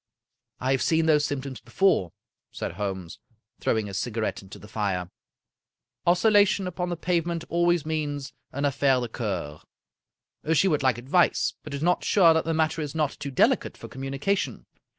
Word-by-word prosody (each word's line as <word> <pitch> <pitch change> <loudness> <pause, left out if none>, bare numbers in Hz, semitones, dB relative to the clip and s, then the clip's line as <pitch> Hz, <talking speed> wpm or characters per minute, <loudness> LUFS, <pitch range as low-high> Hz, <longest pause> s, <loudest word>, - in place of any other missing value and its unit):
" - - -59
I 130 +1 0
have 135 - +2
seen 160 0 +2
those 150 -2 +4
symptoms 135 -2 -4
before," 190 - +2 0.4
said - - -4
Holmes, 95 -3 -5 0.4
throwing 110 -2 0
his 100 -2 -4
cigarette 115 -1 -2
into 95 -1 -12
the 105 - -13
fire. 100 -5 -2 0.5
" - - -31
Oscillation 200 +2 +4
upon 180 0 -3
the 175 - -3
pavement 170 -1 -1
always 175 -2 +2
means 145 -3 -3 0.2
an 140 +2 -2
affaire 135 -1 +2
de 120 -1 -3
cceur. 90 - -4 0.9
She 190 - +4
would 150 -5 +2
like 130 -3 +2
advice, 140 +9 +2
but 150 -2 -6
is 140 - -4
not 180 +1 +2
sure 175 -5 +5
that 160 -1 0
the 165 - 0
matter 160 0 +1
is 150 0 -5
not 150 -3 +1
too 145 -2 -6
deli 130 - +4
cate - - -10
for - - -9
communication. 135 +9 -2
145 Hz, 175 wpm, -26 LUFS, 120-170 Hz, 0.9 s, sure